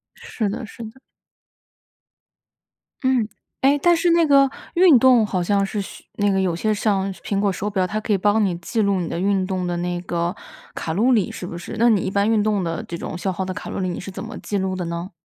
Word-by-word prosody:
是 215 Hz, -4 st, -3 dB
的 225 Hz, +4 st, -4 dB
是 225 Hz, +1 st, -10 dB
的。 225 Hz, +4 st, -11 dB, 2.0 s
嗯， 260 Hz, -4 st, +2 dB, 0.3 s
诶， 280 Hz, +2 st, +4 dB
但 345 Hz, +1 st, +4 dB
是 340 Hz, +1 st, +2 dB
那 335 Hz, 0 st, +4 dB
个 275 Hz, -1 st, +6 dB, 0.3 s
运 340 Hz, -7 st, +7 dB
动 250 Hz, -3 st, +5 dB
好 185 Hz, -3 st, -1 dB
像 200 Hz, +2 st, +1 dB
是 205 Hz, +1 st, -3 dB
需 195 Hz, -, -10 dB
那 205 Hz, 0 st, +2 dB
个 190 Hz, -, +1 dB
有 185 Hz, -3 st, 0 dB
些 215 Hz, +6 st, 0 dB
像 195 Hz, -2 st, 0 dB
苹 195 Hz, +1 st, -3 dB
果 200 Hz, -1 st, +2 dB
手 195 Hz, +2 st, -4 dB
表， 190 Hz, -3 st, 0 dB
它 215 Hz, +3 st, -2 dB
可 215 Hz, 0 st, -1 dB
以 -, -, +3 dB
帮 205 Hz, +3 st, +2 dB
你 185 Hz, -3 st, -1 dB
记 175 Hz, +7 st, -4 dB
录 200 Hz, -2 st, +1 dB
你 170 Hz, -, -3 dB
的 170 Hz, -, -3 dB
运 195 Hz, 0 st, +1 dB
动 185 Hz, -2 st, -2 dB
的 175 Hz, 0 st, -2 dB
那 175 Hz, 0 st, -2 dB
个 175 Hz, +1 st, -2 dB, 0.4 s
卡 160 Hz, -, -3 dB
路 225 Hz, +9 st, +3 dB
里， 215 Hz, -7 st, +2 dB
是 180 Hz, -, -7 dB
不 170 Hz, -, -6 dB
是？ 175 Hz, -, -7 dB
那 235 Hz, +1 st, +5 dB
你 210 Hz, -5 st, +3 dB
一 -, -, -2 dB
般 200 Hz, +2 st, +2 dB
运 220 Hz, -2 st, +3 dB
动 210 Hz, -3 st, +1 dB
的 165 Hz, -1 st, -3 dB
这 170 Hz, -, -7 dB
种 170 Hz, -, -5 dB
消 190 Hz, +2 st, -2 dB
耗 185 Hz, +1 st, -3 dB
的 185 Hz, -, -4 dB
卡 -, -, -7 dB
路 -, -, -4 dB
里， 185 Hz, -1 st, -1 dB
你 175 Hz, -, -4 dB
是 195 Hz, -, -7 dB
怎 -, -, -7 dB
么 -, -, -7 dB
记 205 Hz, -, -3 dB
录 190 Hz, 0 st, -1 dB
的 180 Hz, -1 st, -3 dB
呢？ 170 Hz, +3 st, -5 dB
200 Hz, 270 characters per minute, -22 LUFS, 185-220 Hz, 2.0 s, 运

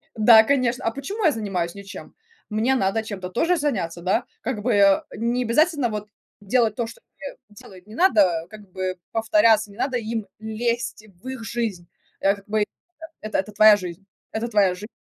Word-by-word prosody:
Да, 220 Hz, 0 st, +7 dB
конечно. 250 Hz, -2 st, 0 dB
"А 225 Hz, -, +1 dB
почему 370 Hz, -, -4 dB
я 320 Hz, -, +6 dB
занимаюсь 190 Hz, -7 st, -3 dB
ничем? 200 Hz, 0 st, -10 dB, 0.4 s
Мне 225 Hz, +5 st, +1 dB
надо 210 Hz, -1 st, +1 dB
чем-то 190 Hz, -4 st, -6 dB
тоже 335 Hz, -, +1 dB
заняться, 190 Hz, -, -2 dB
да?" 185 Hz, +2 st, 0 dB, 0.2 s
Как 225 Hz, -3 st, -3 dB
бы, 210 Hz, -2 st, +2 dB
а, 195 Hz, -1 st, +4 dB
не 240 Hz, +3 st, 0 dB
обязательно 285 Hz, +1 st, +2 dB
вот 210 Hz, -1 st, -5 dB, 0.3 s
делать 220 Hz, +1 st, +1 dB
то, 235 Hz, -, -1 dB
что 230 Hz, -, -12 dB, 0.2 s
тебе 280 Hz, 0 st, -8 dB
делают. 195 Hz, -2 st, -15 dB
Не 215 Hz, -, -11 dB
надо 195 Hz, -, +3 dB
как 210 Hz, -2 st, -13 dB
бы 185 Hz, 0 st, -3 dB
повторяться, 225 Hz, -3 st, +3 dB
не 200 Hz, -, -16 dB
надо 260 Hz, +1 st, -1 dB
им 225 Hz, -2 st, -4 dB
лезть 235 Hz, +1 st, -3 dB, 0.2 s
в -, -, -10 dB
их 260 Hz, -3 st, -6 dB
жизнь, 220 Hz, -8 st, -3 dB, 0.3 s
э, 195 Hz, +1 st, +2 dB
как 200 Hz, 0 st, -17 dB
бы 210 Hz, 0 st, +1 dB, 0.6 s
это 215 Hz, -, -2 dB
это 200 Hz, +3 st, -4 dB
твоя 215 Hz, 0 st, +7 dB
жизнь 180 Hz, 0 st, -8 dB, 0.3 s
это 225 Hz, +2 st, -3 dB
твоя 205 Hz, -5 st, +2 dB
жи 210 Hz, +5 st, -13 dB
220 Hz, 185 wpm, -23 LUFS, 200-240 Hz, 0.6 s, Да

